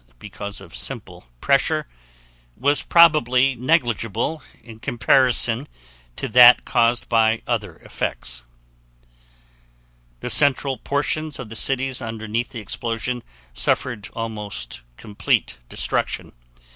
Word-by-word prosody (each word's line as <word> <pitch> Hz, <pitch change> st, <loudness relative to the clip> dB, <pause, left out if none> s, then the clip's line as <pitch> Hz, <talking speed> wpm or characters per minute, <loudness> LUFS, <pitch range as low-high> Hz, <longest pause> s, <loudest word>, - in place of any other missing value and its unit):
because 100 Hz, +5 st, -8 dB
of -, -, -12 dB
simple -, -, -4 dB, 0.2 s
pressure) -, -, +1 dB, 0.7 s
was 145 Hz, +2 st, +2 dB
probably 135 Hz, -6 st, +4 dB
negligible 120 Hz, -, -1 dB, 0.2 s
in 115 Hz, -1 st, -13 dB
comparison 120 Hz, +2 st, +3 dB, 0.5 s
to -, -, -4 dB
that 125 Hz, 0 st, +7 dB
caused 120 Hz, +1 st, +1 dB
by 110 Hz, -1 st, +2 dB
other -, -, -3 dB
effects. 60 Hz, 0 st, -4 dB, 1.8 s
The -, -, -4 dB
central 140 Hz, -2 st, +3 dB
portions 145 Hz, +4 st, -2 dB
of 125 Hz, -4 st, -8 dB
the 115 Hz, -, -8 dB
cities 130 Hz, +2 st, 0 dB
underneath 115 Hz, 0 st, -4 dB
the 115 Hz, -, -7 dB
explosions 115 Hz, +3 st, -4 dB, 0.3 s
suffered 110 Hz, -, -1 dB
almost 105 Hz, -, -5 dB, 0.2 s
complete 100 Hz, -, -1 dB
destruction. -, -, -2 dB
120 Hz, 100 wpm, -21 LUFS, 110-135 Hz, 1.8 s, that